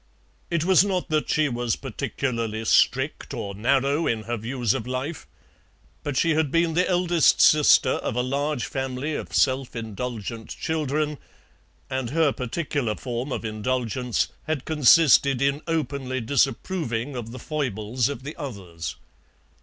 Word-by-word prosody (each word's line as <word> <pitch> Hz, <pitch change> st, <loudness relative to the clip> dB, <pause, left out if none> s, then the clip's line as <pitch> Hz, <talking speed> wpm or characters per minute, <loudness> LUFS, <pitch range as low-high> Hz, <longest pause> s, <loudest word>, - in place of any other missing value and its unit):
It 170 Hz, -2 st, 0 dB
was 185 Hz, 0 st, +6 dB
not 185 Hz, -3 st, -1 dB
that 155 Hz, -1 st, 0 dB
she 155 Hz, -1 st, +2 dB
was 120 Hz, -3 st, -1 dB
particularly 115 Hz, -4 st, -3 dB
strict -, -, +2 dB
or 100 Hz, -, -4 dB
narrow 135 Hz, +8 st, +1 dB
in 110 Hz, -2 st, -1 dB
her 120 Hz, +2 st, -2 dB
views 120 Hz, 0 st, -1 dB
of 110 Hz, -, -4 dB
life, 130 Hz, +5 st, -4 dB, 0.7 s
but 145 Hz, -3 st, -3 dB
she 165 Hz, -, +3 dB
had 155 Hz, -1 st, +2 dB
been 165 Hz, +2 st, +2 dB
the 180 Hz, +3 st, +2 dB
eldest 175 Hz, -2 st, +3 dB
sister 150 Hz, -3 st, +6 dB
of 110 Hz, -, -2 dB
a 125 Hz, -, +1 dB
large 140 Hz, +1 st, -1 dB
family 135 Hz, +2 st, -3 dB
of -, -, -5 dB
self 130 Hz, -1 st, +1 dB
indulgent 115 Hz, 0 st, -5 dB
children, 150 Hz, -1 st, -2 dB, 0.7 s
and 130 Hz, -3 st, -3 dB
her 155 Hz, +1 st, +3 dB
particular 130 Hz, -3 st, -2 dB
form 125 Hz, +3 st, -4 dB
of 115 Hz, -, -3 dB
indulgence 115 Hz, -3 st, -1 dB, 0.2 s
had 155 Hz, -4 st, -2 dB
consisted 145 Hz, -3 st, +5 dB
in 140 Hz, +2 st, +1 dB
openly 140 Hz, -5 st, -2 dB
disapproving 135 Hz, 0 st, -1 dB
of 120 Hz, -2 st, -5 dB
the 130 Hz, -, -8 dB
foibles 125 Hz, -5 st, -2 dB
of 135 Hz, -3 st, -6 dB
the 150 Hz, +3 st, -6 dB
others. 95 Hz, -, -6 dB
130 Hz, 145 wpm, -25 LUFS, 120-150 Hz, 0.7 s, was